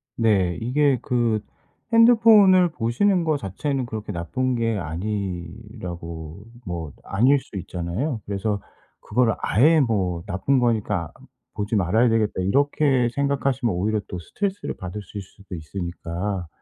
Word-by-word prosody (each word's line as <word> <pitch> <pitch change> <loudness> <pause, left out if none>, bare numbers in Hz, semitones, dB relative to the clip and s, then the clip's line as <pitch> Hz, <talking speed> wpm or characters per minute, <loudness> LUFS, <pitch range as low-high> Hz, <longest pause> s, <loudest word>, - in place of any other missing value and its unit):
네. 100 -6 +2
이게 135 +2 +2
그 120 -3 +1 0.5
핸드폰을 220 -6 +6
보시는 170 - +1
거 155 -2 +1
자체는 130 +6 -3
그렇게 110 -2 -5
나쁜 125 +9 -2
게 115 -2 0
아니라고 85 -2 -5 0.2
뭐 85 -5 -5
아닐 130 +8 +3
수 105 - -10
있잖아요. 95 - -3
그래서 100 0 -2 0.4
그거를 120 -3 +1
아예 155 +8 +4
뭐 95 -9 0
'나쁜 105 +8 +1
거니까 105 -8 0 0.4
보지 105 +2 -2
말아야 110 +5 +3
되겠다.' 110 -4 +1
이렇게 135 +3 +2
생각하시면 135 -5 0
오히려 105 +4 0
또 90 - -6
스트레스를 195 - -4
받으실 100 +2 -7
수도 100 0 -11
있으니까, 85 +2 -4
110 Hz, 295 characters per minute, -23 LUFS, 90-135 Hz, 0.5 s, 핸드폰을